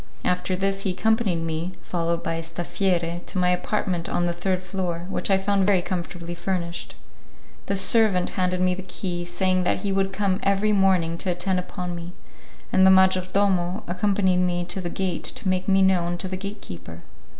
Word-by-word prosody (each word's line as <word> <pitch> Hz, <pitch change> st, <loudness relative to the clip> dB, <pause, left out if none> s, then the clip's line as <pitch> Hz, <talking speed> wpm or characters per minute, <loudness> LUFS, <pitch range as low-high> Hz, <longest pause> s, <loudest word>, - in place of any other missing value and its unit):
After 180 Hz, +1 st, 0 dB
this 195 Hz, +1 st, -1 dB
he 195 Hz, -2 st, -1 dB
accompanied 210 Hz, -3 st, +1 dB
me, 165 Hz, +3 st, -3 dB
followed 170 Hz, -1 st, -1 dB
by -, -, -1 dB
a 165 Hz, -, -2 dB
'staffiere' 170 Hz, +1 st, -1 dB
to -, -, -7 dB
my 180 Hz, -1 st, +3 dB
apartment 180 Hz, -1 st, -1 dB
on 175 Hz, -, 0 dB
the 175 Hz, -, 0 dB
third 185 Hz, +1 st, -1 dB
floor, 180 Hz, -2 st, -3 dB
which -, -, -2 dB
I 195 Hz, -, +5 dB
found 195 Hz, 0 st, +1 dB
very 190 Hz, -4 st, +3 dB
comfortably 175 Hz, -1 st, -4 dB
furnished. 175 Hz, -1 st, -3 dB, 0.7 s
The 200 Hz, -, 0 dB
servant 195 Hz, -2 st, +4 dB
handed 185 Hz, -1 st, 0 dB
me 185 Hz, 0 st, +3 dB
the 185 Hz, -, -5 dB
key, 180 Hz, -2 st, -4 dB
saying 185 Hz, +1 st, +1 dB
that -, -, 0 dB
he 200 Hz, -, -1 dB
would 195 Hz, 0 st, +1 dB
come 195 Hz, -1 st, 0 dB
every 200 Hz, +2 st, +2 dB
morning 185 Hz, -4 st, +2 dB
to 190 Hz, -, -1 dB
attend 180 Hz, +1 st, 0 dB
upon 180 Hz, 0 st, -5 dB
me, 170 Hz, +1 st, -7 dB, 0.6 s
and 190 Hz, -, +5 dB
the 190 Hz, -, +8 dB
major 190 Hz, -1 st, +5 dB
domo 190 Hz, 0 st, +1 dB
accompanied 190 Hz, +1 st, +1 dB
me 175 Hz, -1 st, +1 dB
to 190 Hz, -, -1 dB
the 175 Hz, -, -3 dB
gate 185 Hz, 0 st, -2 dB
to -, -, -3 dB
make 185 Hz, 0 st, 0 dB
me 195 Hz, -1 st, +4 dB
known 175 Hz, -2 st, +2 dB
to 185 Hz, -, -4 dB
the 185 Hz, -, -3 dB
gate 200 Hz, +2 st, -6 dB
keeper. 85 Hz, -1 st, -9 dB
185 Hz, 195 wpm, -24 LUFS, 175-195 Hz, 0.7 s, the